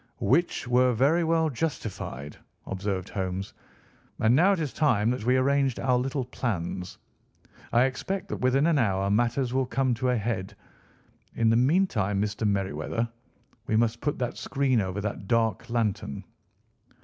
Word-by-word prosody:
"Which 170 Hz, -6 st, +1 dB
were 125 Hz, +1 st, +4 dB
very 145 Hz, +9 st, +3 dB
well 165 Hz, 0 st, +2 dB
justified," 100 Hz, -, -4 dB, 0.3 s
observed 95 Hz, -1 st, -3 dB
Holmes. 95 Hz, 0 st, -4 dB, 0.7 s
"And 110 Hz, +3 st, +4 dB
now 180 Hz, +7 st, +5 dB
it 190 Hz, -, -1 dB
is 150 Hz, -5 st, -3 dB
time 120 Hz, -8 st, +2 dB
that 125 Hz, -4 st, -3 dB
we 130 Hz, +1 st, +4 dB
arranged 135 Hz, -1 st, +2 dB
our 130 Hz, -1 st, +2 dB
little 130 Hz, +1 st, -1 dB
plans. 95 Hz, -7 st, -4 dB, 0.7 s
I 120 Hz, -, +5 dB
expect 180 Hz, +9 st, -2 dB
that -, -, -3 dB
within 130 Hz, +3 st, +3 dB
an 165 Hz, -3 st, +3 dB
hour 100 Hz, -4 st, +1 dB
matters 120 Hz, +3 st, +1 dB
will 130 Hz, -1 st, +1 dB
come 130 Hz, -1 st, +1 dB
to 125 Hz, +2 st, -1 dB
a 125 Hz, -, +2 dB
head. 105 Hz, -2 st, -3 dB, 0.8 s
In 115 Hz, -1 st, +3 dB
the -, -, +3 dB
meantime 120 Hz, -, +2 dB
Mr. 105 Hz, +1 st, -1 dB
Merryweather, 100 Hz, +2 st, -1 dB, 0.6 s
we 110 Hz, -, +1 dB
must 115 Hz, +1 st, +1 dB
put 145 Hz, +1 st, -1 dB
the 125 Hz, -2 st, -1 dB
screen 135 Hz, -4 st, 0 dB
over 95 Hz, +1 st, -3 dB
that 100 Hz, -1 st, -4 dB
dark 115 Hz, 0 st, +1 dB
lantern." 105 Hz, -, -2 dB
120 Hz, 155 wpm, -27 LUFS, 105-135 Hz, 0.8 s, now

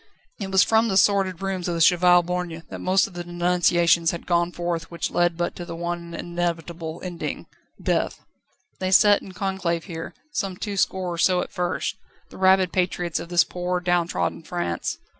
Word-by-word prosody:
It 195 Hz, -2 st, -4 dB
was 190 Hz, 0 st, +5 dB
from 225 Hz, +1 st, +3 dB
the 190 Hz, -3 st, +1 dB
sordid 195 Hz, -2 st, +2 dB
rooms 190 Hz, -2 st, -2 dB
of 175 Hz, -, -1 dB
the -, -, -2 dB
Cheval 175 Hz, +1 st, +5 dB
Borgne 175 Hz, -2 st, -4 dB
that -, -, -6 dB
most 190 Hz, +1 st, +3 dB
of 200 Hz, -, -10 dB
the 175 Hz, 0 st, -5 dB
denunciations 175 Hz, -1 st, +2 dB
had 170 Hz, -, -4 dB
gone 175 Hz, 0 st, +1 dB
forth 170 Hz, -2 st, -3 dB
which 170 Hz, -, -3 dB
led 175 Hz, -1 st, +1 dB
but 175 Hz, 0 st, -2 dB
to 175 Hz, -, -5 dB
the 170 Hz, -1 st, -7 dB
one 170 Hz, 0 st, -4 dB
inevitable 170 Hz, -1 st, -4 dB
ending 180 Hz, -2 st, -5 dB, 0.3 s
death. -, -, -1 dB, 0.6 s
They 185 Hz, -, -1 dB
sat 205 Hz, +2 st, +6 dB
in 190 Hz, -, -11 dB
conclave 185 Hz, -3 st, -2 dB
here, 165 Hz, -3 st, -7 dB, 0.2 s
some 195 Hz, -8 st, -3 dB
twoscore 190 Hz, -3 st, -1 dB
or -, -, -5 dB
so 180 Hz, 0 st, +3 dB
at -, -, -6 dB
first, 180 Hz, -2 st, -2 dB, 0.3 s
the -, -, -11 dB
rabid 190 Hz, -1 st, +4 dB
patriots 180 Hz, -2 st, 0 dB
of 170 Hz, -, -8 dB
this 175 Hz, -1 st, +5 dB
poor, 180 Hz, +1 st, -2 dB
downtrodden 175 Hz, -2 st, 0 dB
France. 165 Hz, -, -3 dB
175 Hz, 180 wpm, -24 LUFS, 170-185 Hz, 0.6 s, sat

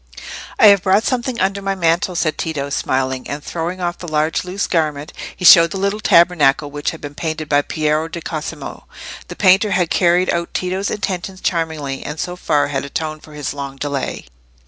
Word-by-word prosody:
"I -, -, +6 dB
have 200 Hz, -2 st, +5 dB
brought 195 Hz, +3 st, +3 dB
something 250 Hz, -1 st, -1 dB
under 195 Hz, +1 st, 0 dB
my 195 Hz, 0 st, -1 dB
mantle," 175 Hz, 0 st, +1 dB
said 160 Hz, -2 st, 0 dB
Tito, 145 Hz, -4 st, -3 dB
smiling; 130 Hz, -1 st, -1 dB
and 145 Hz, +1 st, -5 dB
throwing 175 Hz, +2 st, -4 dB
off 175 Hz, -1 st, -3 dB
the 175 Hz, -, -8 dB
large 155 Hz, 0 st, 0 dB
loose 185 Hz, +2 st, -3 dB
garment, 155 Hz, -3 st, -1 dB, 0.2 s
he 180 Hz, -, -5 dB
showed 165 Hz, -1 st, +9 dB
the 195 Hz, -, -5 dB
little 200 Hz, +2 st, -1 dB
tabernacle 160 Hz, -7 st, +3 dB
which 145 Hz, 0 st, -2 dB
had 165 Hz, -, -8 dB
been 145 Hz, 0 st, -7 dB
painted 155 Hz, 0 st, -4 dB
by 145 Hz, 0 st, +3 dB
Piero 155 Hz, +1 st, -1 dB
di 170 Hz, +1 st, -6 dB
Cosimo. 155 Hz, -2 st, -6 dB, 0.4 s
The -, -, -8 dB
painter 195 Hz, +2 st, +4 dB
had 180 Hz, -4 st, 0 dB
carried 180 Hz, 0 st, +3 dB
out 170 Hz, 0 st, -3 dB
Tito's 185 Hz, +2 st, -1 dB
intention 190 Hz, -2 st, -3 dB
charmingly, 160 Hz, -7 st, -2 dB
and 150 Hz, +2 st, -6 dB
so 180 Hz, -1 st, -3 dB
far 145 Hz, -5 st, 0 dB
had 135 Hz, -2 st, -2 dB
atoned 155 Hz, +2 st, -4 dB
for 155 Hz, -, -15 dB
his 150 Hz, -2 st, -4 dB
long 140 Hz, -1 st, -6 dB
delay. 140 Hz, -1 st, -4 dB
165 Hz, 190 wpm, -18 LUFS, 150-185 Hz, 0.4 s, showed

